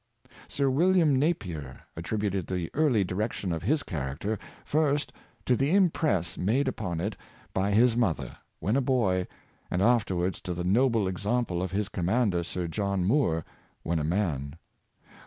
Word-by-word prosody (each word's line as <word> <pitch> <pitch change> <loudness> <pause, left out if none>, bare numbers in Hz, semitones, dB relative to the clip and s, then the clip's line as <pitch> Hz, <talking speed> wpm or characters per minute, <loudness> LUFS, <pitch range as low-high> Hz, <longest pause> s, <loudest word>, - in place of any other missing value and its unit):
Sir 140 -1 0
William 165 -2 +4
Napier 90 - -2 0.2
attributed 100 +2 -2
the 90 -3 -3
early 140 -9 +3
direction 95 0 -2
of 80 -1 -2
his 150 - +1
character 80 +6 -3 0.3
first 150 -1 +1 0.3
to 125 - +3
the 140 +8 +2
impress 155 - +2
made 120 +9 +1
upon 90 -10 -2
it 100 +5 -2 0.4
by 95 +1 +1
his 115 +3 +4
mother, 110 -9 0 0.2
when 105 +5 0
a 140 - +3
boy, 105 -9 +1 0.4
and 90 - -1
afterwards 95 -5 +1
to 90 -1 -4
the 90 - -3
noble 115 +2 +3
exam 105 +6 0
ple 90 -3 -3
of 95 - -2
his 100 +1 -1
commander. 95 -1 +1
Sir 90 +1 -3
John 100 +1 -1
Moore, 95 - +2 0.4
when 85 0 0
a - - -1
man. 75 -5 -1
100 Hz, 155 wpm, -28 LUFS, 90-125 Hz, 0.4 s, William